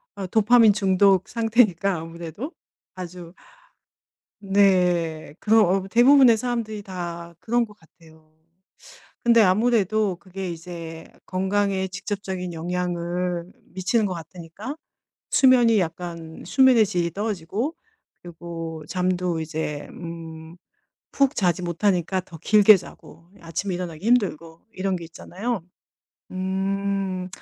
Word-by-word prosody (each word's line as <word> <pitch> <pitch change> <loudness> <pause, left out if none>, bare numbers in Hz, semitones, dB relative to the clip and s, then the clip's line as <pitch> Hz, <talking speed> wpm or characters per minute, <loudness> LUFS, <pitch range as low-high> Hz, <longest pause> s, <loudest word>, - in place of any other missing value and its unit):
어 195 -2 -5
도파민 220 +2 +5
중독 195 -1 +3
상태니까 220 -5 +2
아무래도. 170 - -7 0.5
아주 175 -1 -8 1.1
네. 180 -6 +2
그러 220 +1 +4
어, 190 0 +1
대부분의 245 +2 +6
사람들이 225 -3 -3
다 170 -3 -7
그런 240 +1 +1
것 210 -2 -14
같아요. 160 -1 -22 0.9
근데 235 -1 +6
아무래도 210 -1 +2
그게 185 +1 -7
이제 165 -1 -8 0.2
건강에 190 0 0
직접적인 190 -1 -5
영향을 175 +1 -3 0.2
미치는 195 +5 +1
것 190 - -3
같으니까 175 - -8 0.5
수면이 245 -4 +5
약간 165 -1 -5
수면의 260 -5 +5
질이 175 -4 -1
떨어지고 205 - -3 0.5
그리고 165 -2 -7
잠도 180 -2 -1
이제 155 -2 -4
음 165 -1 -9 0.6
푹 275 0 +2
자지 180 -2 +1
못하니까 180 +1 0
더 175 -2 -13
길게 210 +4 +6
자고 170 -2 -14
예 - - -21
아침에 170 +3 -3
일어나기 175 0 -6
힘들고 170 -9 0
이런 190 0 -1
게 170 - -9
있잖아요. 200 +6 -5 0.7
음. 190 0 -2
185 Hz, 255 characters per minute, -24 LUFS, 170-210 Hz, 1.1 s, 대부분의